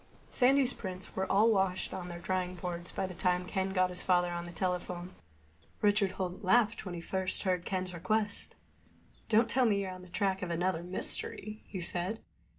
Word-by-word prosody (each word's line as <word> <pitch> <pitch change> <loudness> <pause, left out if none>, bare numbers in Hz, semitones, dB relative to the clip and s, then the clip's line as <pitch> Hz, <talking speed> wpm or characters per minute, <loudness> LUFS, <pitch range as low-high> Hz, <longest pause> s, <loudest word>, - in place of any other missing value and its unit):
Sandy's 265 0 +4
prints 185 -2 -7
were 190 0 -1
all 215 +4 +5
washed 190 -3 +1
and 190 - -4
on 175 - -7
their 175 -1 -6
drying 185 +1 -2
boards 175 0 -5
by - - -2
the 185 - -6
time 180 0 +1
Ken 190 0 -1
got 185 -1 +2
his 180 - -4
father 175 -1 +3
on 175 0 -4
the - - -7
telephone. 180 0 -3 0.7
Richard 205 -2 +3
Holt 185 +2 -4
laughed 220 +2 +3
when 175 - -4
he 170 - -5
first 190 +2 -2
heard 180 -2 0
Ken's 185 -1 -2
request. 205 +4 -1 0.7
"Don't 225 +1 +5
tell 255 +1 +3
me 205 -2 +3
you're 190 -1 -3
on 185 0 -8
the 180 - -13
track 195 +1 0
of 180 - -3
another 170 0 0
mystery," 195 +4 -2
he 185 - -5
said. 180 +5 +1
185 Hz, 195 wpm, -32 LUFS, 180-200 Hz, 0.7 s, all